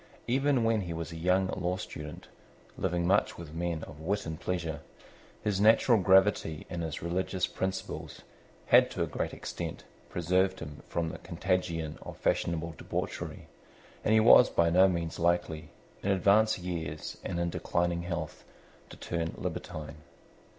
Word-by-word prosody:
Even 135 0 +2
when 115 -1 +2
he 85 -3 -4
was 85 0 -5
a - - -7
young 90 +3 +2
law 90 +1 -1
student, 75 -5 -8 0.5
living 85 0 -1
much 100 +3 +2
with 85 -2 -9
men 85 -1 -2
of 75 - -10
wit 100 +6 -1
and 80 -1 -5
pleasure, 85 -4 -2 0.6
his 100 -2 0
natural 110 +1 +5
gravity 95 -4 +3
and 85 -2 -3
his 80 -2 -4
religious 90 +2 0
principles 95 0 -4 0.4
had - - +6
to - - -2
a - - +1
great - - -3
extent - - -6 0.3
preserved 95 +2 +1
him 75 0 -8
from 85 -1 -1
the - - -7
contagion 85 -3 -2
of - - -9
fashionable 85 -1 0
debauchery; - - -4 0.6
and 110 - +3
he - - +7
was 120 +3 +8
by 85 0 +2
no 95 +3 +7
means 85 -2 -2
likely, 85 -3 0 0.3
in 100 - -1
advanced 100 +3 +4
years 80 -4 -5
and 85 -2 -3
in 85 0 0
declining 85 0 0
health, 85 -3 -4 0.5
to - - -11
turn 85 -1 -3
libertine. 75 +1 -5
85 Hz, 155 wpm, -30 LUFS, 80-95 Hz, 0.6 s, was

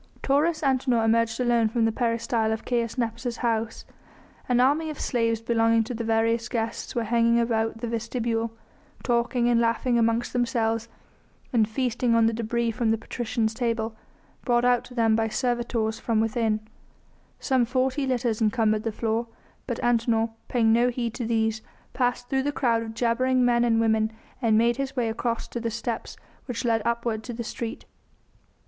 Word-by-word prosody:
Taurus 305 +4 +2
Antinor 255 -4 +2
emerged 230 +1 +2
alone 240 -3 +2
from 230 0 +1
the 225 - +2
peristyle 230 -1 0
of 220 - -3
Caius 235 -2 -1
Nepos' 235 0 -2
house. 225 -2 -2 0.6
An 245 -1 +3
army 290 +5 +3
of 305 - -7
slaves 230 -2 0
belonging 230 -1 +2
to 245 +3 -5
the 230 0 -4
various 230 +1 +1
guests 225 -1 -3
were 235 - 0
hanging 235 +1 +3
about 225 -1 0
the 240 - -2
vestibule, 230 0 -2 0.5
talking 240 0 +1
and 235 -1 +3
laughing 235 +1 +1
amongst 230 +1 +1
themselves 230 -2 0 0.6
and 220 -3 +3
feasting 245 0 0
on 230 -1 +4
the 225 - +2
debris 230 +1 -1
from 225 0 -1
the 225 - +2
patricians' 225 -1 -2
table, 230 -2 -2 0.5
brought 240 -1 +2
out 245 -1 +3
to 250 - -13
them 225 -2 +3
by 225 0 +1
servitors 235 -1 -1
from 225 -2 0
within; 220 -1 0 0.8
some 260 -3 +2
forty 260 +3 0
litters 240 -3 0
encumbered 215 0 +2
the 225 - -2
floor, 225 +2 -1 0.4
but 240 -3 -3
Antinor, 230 -1 +2 0.2
paying 225 -3 +3
no 240 +2 +4
heed 235 -2 -3
to 240 -2 -4
these, 220 -1 0 0.3
passed 245 -1 0
through 265 0 +1
the 290 +2 -1
crowd 235 -5 +1
of 225 -1 -7
jabbering 250 +2 +2
men 240 -1 +3
and 230 -1 +3
women 220 -1 +2 0.3
and 225 -3 +3
made 235 +2 +3
his 275 0 -3
way 240 -3 0
across 230 +1 -2
to 240 - -4
the 230 0 -2
steps 230 +1 -4 0.3
which 245 -1 -4
led 225 -1 +2
upwards 235 -2 -1
to 240 - -4
the 235 +1 -4
street. 230 0 -5
230 Hz, 175 wpm, -25 LUFS, 225-245 Hz, 0.8 s, on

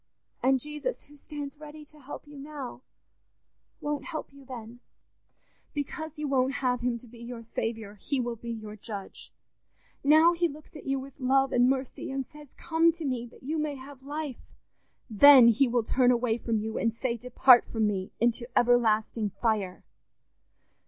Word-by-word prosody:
And 265 0 +3
Jesus, 300 - -4
who 295 - -17
stands 290 0 -8
ready 300 0 -10
to 300 +1 -14
help 285 +2 -9
you 295 0 -13
now, 275 -3 -7 1.0
won't 295 -1 -3
help 310 -4 -6
you 280 0 -15
then; 240 -2 -9 1.0
because 310 +2 -4
you 300 -1 -3
won't 265 -1 +2
have 250 -3 0
him 240 -1 0
to 245 - -15
be 235 +1 -15
your 235 0 -8
Saviour, 225 -2 -4
he 255 +7 -3
will 240 -1 -2
be 235 +1 -9
your 215 -2 -6
judge. 205 -2 -8 0.7
Now 315 +4 +6
he 345 0 +1
looks 305 +1 -12
at 300 - -10
you 270 0 0
with 275 +1 -11
love 270 +1 +3
and 245 +1 +4
mercy 265 -1 -2
and 270 0 -3
says, 300 +3 -14
'Come 330 0 +3
to 330 -1 -7
me 250 -3 -2
that 235 - -18
you 310 +4 -2
may 300 -1 -2
have 270 0 -11
life'; 290 -1 -6 0.5
then 255 +2 +8
he 245 +4 +4
will 240 -1 +1
turn 250 +2 +3
away 240 -2 +2
from 230 -1 -1
you, 220 +1 -3
and 230 -1 0
say, 235 0 -1
'Depart 250 +1 +5
from 220 -2 +1
me 195 -3 -1
into 235 +1 0
ever 245 0 +5
lasting 220 -1 0
fire! 210 -6 -1
255 Hz, 180 wpm, -28 LUFS, 235-290 Hz, 1.0 s, then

